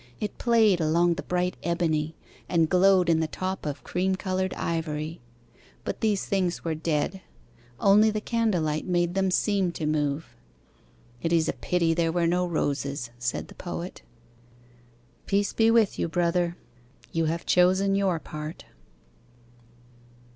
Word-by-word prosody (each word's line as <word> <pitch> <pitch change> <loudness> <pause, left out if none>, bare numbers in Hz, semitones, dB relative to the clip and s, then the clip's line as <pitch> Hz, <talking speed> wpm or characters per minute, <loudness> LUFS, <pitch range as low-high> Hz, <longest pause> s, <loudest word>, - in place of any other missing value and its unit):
It 210 -2 -4
played 220 -6 +4
along 170 +2 +3
the 180 - -5
bright 180 0 -1
ebony, 160 -2 0 0.3
And 165 -2 +3
glowed 185 -1 +5
in 165 -1 +3
the 160 - 0
top 185 0 -4
of 145 - -5
cream 190 +2 0
coloured 185 -1 -2
ivory. 160 -1 -3 0.6
But - - -4
these 210 -3 +1
things 185 -3 -1
were 165 - 0
dead, 160 +4 -1 0.6
Only 210 +2 +5
the 215 0 -1
candle 220 -6 0
light 155 +2 -2
made 175 -1 +1
them 190 0 +1
seem 195 -1 +1
to 160 - -4
move. 150 - -1 0.9
"It 165 - -1
is 165 -2 +3
a - - 0
pity 170 -2 0
there 165 0 +1
were 170 0 +1
no 180 +2 +1
roses," 140 -6 -2
said 120 0 -2
the - - -13
Poet. 175 0 -6 1.3
Peace 200 0 +1
be 225 0 +4
with 225 -3 +3
you, - - 0
Brother. 175 +1 0 0.5
You 165 -1 0
have 165 +2 -2
chosen 190 +2 +3
your 195 -3 +1
part. 155 0 -7
175 Hz, 145 wpm, -26 LUFS, 160-190 Hz, 1.3 s, glowed